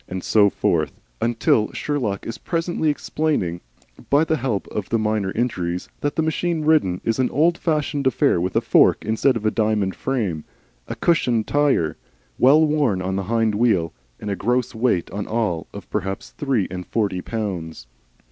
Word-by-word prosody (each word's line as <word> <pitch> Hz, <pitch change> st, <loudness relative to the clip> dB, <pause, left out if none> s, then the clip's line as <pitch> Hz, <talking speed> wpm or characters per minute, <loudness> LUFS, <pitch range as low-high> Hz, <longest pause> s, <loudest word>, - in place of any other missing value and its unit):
And 95 Hz, -1 st, -5 dB
so 105 Hz, -2 st, +4 dB
forth, 80 Hz, -7 st, -1 dB, 0.2 s
until 115 Hz, -2 st, +2 dB
Sherlock 120 Hz, -10 st, -2 dB
is 115 Hz, -, -6 dB
presently 165 Hz, -2 st, -1 dB
explaining, 145 Hz, -, -1 dB, 0.5 s
by 145 Hz, +3 st, +4 dB
the 160 Hz, -1 st, 0 dB
help 120 Hz, -6 st, -2 dB
of 105 Hz, -3 st, -4 dB
the 115 Hz, -, +2 dB
minor 105 Hz, -3 st, 0 dB
injuries, 90 Hz, -7 st, -2 dB
that 145 Hz, -, -2 dB
the 160 Hz, -, +1 dB
machine 160 Hz, 0 st, -1 dB
ridden 150 Hz, -, +2 dB
is 115 Hz, +2 st, -1 dB
an 130 Hz, -, +2 dB
old 165 Hz, +4 st, +3 dB
fashioned 150 Hz, -4 st, -1 dB
affair 110 Hz, -8 st, +2 dB
with 90 Hz, +1 st, -2 dB
a -, -, +3 dB
fork -, -, +4 dB
instead 110 Hz, +4 st, +2 dB
of 115 Hz, -, -3 dB
the 110 Hz, -, +2 dB
diamond 105 Hz, -4 st, 0 dB
frame, 105 Hz, -, -2 dB, 0.4 s
a -, -, -4 dB
cushioned 120 Hz, -10 st, +1 dB
tire, 145 Hz, -, +1 dB, 0.4 s
well 150 Hz, +5 st, +6 dB
worn 145 Hz, -10 st, +1 dB
on 95 Hz, +1 st, -2 dB
the 100 Hz, -1 st, -2 dB
hind 115 Hz, -2 st, +2 dB
wheel, 100 Hz, -7 st, +1 dB, 0.3 s
and 105 Hz, -, -4 dB
a -, -, -1 dB
gross 120 Hz, +5 st, 0 dB
weight 110 Hz, -7 st, 0 dB
all 100 Hz, 0 st, -4 dB, 0.4 s
on -, -, -9 dB
of -, -, -10 dB
perhaps 95 Hz, +6 st, -3 dB
three 135 Hz, -, -1 dB
and 90 Hz, -1 st, -6 dB
forty 100 Hz, -5 st, -1 dB
pounds. 90 Hz, -, -5 dB
115 Hz, 175 wpm, -22 LUFS, 95-145 Hz, 0.5 s, well